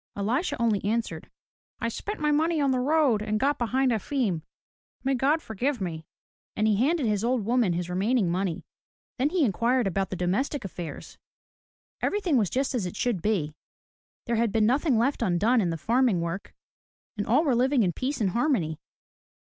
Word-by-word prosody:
EHsha 255 Hz, -, -1 dB
only 225 Hz, -4 st, +1 dB
answered, 225 Hz, +3 st, -2 dB, 0.3 s
" -, -, -65 dB
I -, -, -1 dB
spent 415 Hz, -, -5 dB
my 300 Hz, -1 st, +1 dB
money 315 Hz, +2 st, +2 dB
on 280 Hz, -2 st, +2 dB
the 255 Hz, -, +1 dB
road 275 Hz, -5 st, +2 dB
and 215 Hz, 0 st, -1 dB
got 285 Hz, +3 st, +1 dB
behind 255 Hz, +2 st, +1 dB
Efim. 220 Hz, -, -1 dB, 0.6 s
May 270 Hz, +1 st, +1 dB
God 285 Hz, +5 st, +1 dB
forgive 245 Hz, +5 st, -2 dB
me!'* 160 Hz, -4 st, -5 dB, 0.5 s
And 215 Hz, 0 st, +1 dB
he 210 Hz, -2 st, +3 dB
handed 290 Hz, +5 st, +2 dB
his 210 Hz, -2 st, 0 dB
old 240 Hz, -3 st, 0 dB
woman 235 Hz, -5 st, +2 dB
his 175 Hz, 0 st, -2 dB
remaining 200 Hz, +4 st, +1 dB
money. 180 Hz, -2 st, -2 dB, 0.5 s
Then 275 Hz, +3 st, +2 dB
he 340 Hz, -3 st, +2 dB
inquired 235 Hz, +4 st, +1 dB
about 195 Hz, 0 st, -1 dB
the -, -, -4 dB
domestic 200 Hz, -, -1 dB
affairs. 175 Hz, -4 st, -8 dB, 0.8 s
Everything 390 Hz, -7 st, 0 dB
was 210 Hz, -7 st, +2 dB
just 270 Hz, +2 st, -1 dB
as 220 Hz, -8 st, -1 dB
it 175 Hz, -, -7 dB
should 235 Hz, -8 st, -1 dB
be. 175 Hz, -7 st, 0 dB, 0.7 s
There 235 Hz, -1 st, 0 dB
had 230 Hz, -1 st, +1 dB
been 220 Hz, 0 st, +2 dB
nothing 265 Hz, +2 st, +2 dB
left 255 Hz, +5 st, +1 dB
undone 215 Hz, +7 st, +2 dB
in 180 Hz, -, 0 dB
the 165 Hz, -, -2 dB
farm 240 Hz, -, +2 dB
work 170 Hz, +3 st, -5 dB, 0.6 s
and 205 Hz, -1 st, -3 dB
all 260 Hz, +8 st, +4 dB
were 285 Hz, -6 st, +2 dB
living 255 Hz, +1 st, +3 dB
in 175 Hz, -3 st, 0 dB
peace 270 Hz, -, -3 dB
and 200 Hz, -4 st, +1 dB
harmony. 225 Hz, -, 0 dB
235 Hz, 185 wpm, -26 LUFS, 195-270 Hz, 0.8 s, all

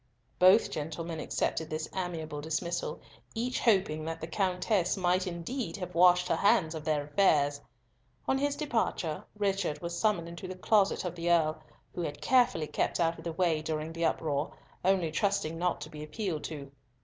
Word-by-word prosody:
Both 185 Hz, +5 st, +6 dB
gentlemen 160 Hz, +2 st, -4 dB
accepted 160 Hz, 0 st, -1 dB
this 155 Hz, 0 st, -3 dB
amiable 160 Hz, -5 st, -3 dB
dismissal, 160 Hz, +3 st, -2 dB, 0.3 s
each 245 Hz, +3 st, -1 dB
hoping 190 Hz, -8 st, +2 dB
that 165 Hz, 0 st, -4 dB
the 160 Hz, -, -4 dB
Countess 185 Hz, +1 st, 0 dB
might 185 Hz, 0 st, +1 dB
indeed 185 Hz, +9 st, -4 dB
have 180 Hz, -2 st, -6 dB
washed 180 Hz, +1 st, +5 dB
her -, -, +1 dB
hands 200 Hz, -6 st, +3 dB
of 160 Hz, -2 st, -6 dB
their 150 Hz, -2 st, 0 dB
affairs. 145 Hz, -3 st, +2 dB, 0.7 s
On 265 Hz, -, +2 dB
his 285 Hz, 0 st, 0 dB
departure 225 Hz, -, -1 dB
Richard 195 Hz, -7 st, 0 dB
was 170 Hz, +1 st, -4 dB
summoned 170 Hz, -2 st, +1 dB
into 170 Hz, +2 st, -7 dB
the 185 Hz, -, -6 dB
closet 200 Hz, +1 st, +2 dB
of 175 Hz, -, -2 dB
the 170 Hz, 0 st, -2 dB
Earl, 155 Hz, -2 st, +2 dB, 0.3 s
who 175 Hz, -, -4 dB
had 150 Hz, -3 st, -4 dB
carefully 245 Hz, -11 st, +3 dB
kept -, -, -1 dB
out 165 Hz, -1 st, +1 dB
of -, -, -10 dB
the 170 Hz, -, -3 dB
way 165 Hz, -3 st, +1 dB
during 155 Hz, +1 st, -3 dB
the 165 Hz, 0 st, -1 dB
uproar, 150 Hz, -3 st, 0 dB, 0.3 s
only 185 Hz, -3 st, +2 dB
trusting 180 Hz, -2 st, 0 dB
not 180 Hz, 0 st, 0 dB
to 150 Hz, -, -6 dB
be 150 Hz, -, -8 dB
appealed 155 Hz, 0 st, -3 dB
to. 140 Hz, -3 st, -7 dB
170 Hz, 175 wpm, -30 LUFS, 155-190 Hz, 0.7 s, Both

